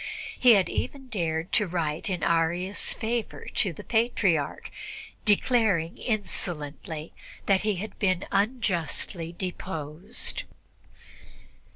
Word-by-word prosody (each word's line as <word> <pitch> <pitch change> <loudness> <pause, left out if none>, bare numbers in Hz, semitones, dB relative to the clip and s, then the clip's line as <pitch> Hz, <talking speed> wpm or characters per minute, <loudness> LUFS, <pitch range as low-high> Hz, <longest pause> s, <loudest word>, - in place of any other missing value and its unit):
He 245 -2 +8
had 195 -3 +4
even 270 -2 -3
dared 165 -5 -1
to 210 - +3
write 165 -1 -1
in 180 -2 -1
Arius' 170 +4 +1
favor 230 0 -2
to 195 - +3
the 165 - -9
Patriarch, 205 - +1 0.5
declaring 205 -6 +3
insolently 165 - -3 0.3
that 195 -2 +4
he 210 -1 +1
had 205 +5 -6
been 185 -3 +2
unjustly 190 - 0
deposed. 180 +1 -4
185 Hz, 100 wpm, -27 LUFS, 165-215 Hz, 0.5 s, He